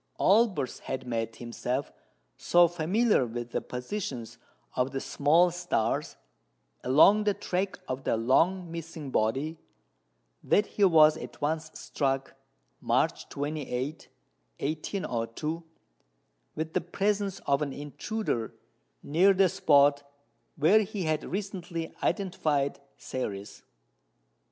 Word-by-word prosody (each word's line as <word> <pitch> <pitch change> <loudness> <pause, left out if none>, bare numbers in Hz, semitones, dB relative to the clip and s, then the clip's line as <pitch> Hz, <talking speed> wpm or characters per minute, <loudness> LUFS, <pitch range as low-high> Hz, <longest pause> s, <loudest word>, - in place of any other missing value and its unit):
Olbers 195 - +3
had 130 -1 -5
made 115 -2 -3
himself 125 +3 -3 0.4
so 175 - +4
familiar 180 - +2
with 120 +1 -6
the - - -1
positions 125 - -5 0.4
of 125 +1 +1
the 135 - -1
small 160 +7 +3
stars 175 -10 -1 0.7
along 160 +11 +6
the 205 -1 +1
track 190 0 -2
of 130 +1 -4
the 115 - +1
long 165 +10 +2
missing 165 -4 -7
body, 135 +9 0 0.8
that 210 - +3
he 205 - -2
was 155 -4 +6
at - - -9
once 155 +2 -1
struck 135 -1 -2 0.5
(March - - 0
28, 145 -1 -4 0.5
1802) 155 - -3 0.9
with 160 0 -4
the - - +1
presence 200 +2 -1
of 140 +1 +2
an 145 -2 -1
intruder 145 - -4 0.5
near 185 +7 +4
the 190 0 +5
spot 145 -2 +4 0.5
where 180 +9 +5
he 205 -2 -4
had 155 -1 0
recently 185 -4 -4
identified 155 -7 0 0.2
Ceres. 100 -5 -5
155 Hz, 110 wpm, -28 LUFS, 130-185 Hz, 0.9 s, along